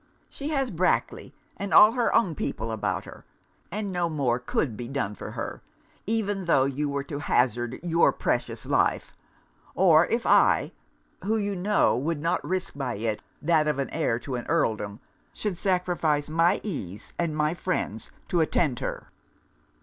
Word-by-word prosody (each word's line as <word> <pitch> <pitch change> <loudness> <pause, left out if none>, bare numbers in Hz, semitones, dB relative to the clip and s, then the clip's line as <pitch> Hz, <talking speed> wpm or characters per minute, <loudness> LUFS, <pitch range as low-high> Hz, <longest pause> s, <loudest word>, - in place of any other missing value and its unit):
She 285 +2 -5
has 270 -5 0
Brackley, 180 +1 0 0.3
and 200 - -4
all 215 - +9
her 240 0 +1
own 185 -8 +3
people 115 -5 -3
about 110 - -2
her; - - -12 0.5
and 205 +1 -3
no 175 -2 0
more 135 -6 0
could 125 -1 -1
be 120 +2 -6
done 130 -6 -2
for - - -8
her, - - -5 0.5
even 205 -3 -1
tho' 135 -6 +4
you 140 +2 -1
were 140 0 -2
to 140 +1 -6
hazard 120 -2 0
your 170 -1 +4
precious - - -2
life, - - +1 0.6
or 170 -3 +5
if 230 0 -1
I, - - +4 0.5
(who 220 +3 +1
you 205 -2 -1
know 200 +3 +2
would 150 +4 -1
not 165 +3 0
risk 185 0 -2
by 135 -4 -3
it 110 0 -2 0.2
that 155 -1 +3
of 150 -2 +1
an 140 - -2
heir 155 -8 0
to 135 - -6
an 120 -1 -4
Earldom) 110 -10 0 0.3
should 210 -4 -3
sacrifice 175 -6 0
my 165 +2 +2
ease 105 - -5
and 165 -3 -1
my 150 +1 +1
friends 175 - -3 0.2
to 175 - +1
attend 155 -5 +1
her.' - - -5
160 Hz, 165 wpm, -26 LUFS, 130-185 Hz, 0.6 s, all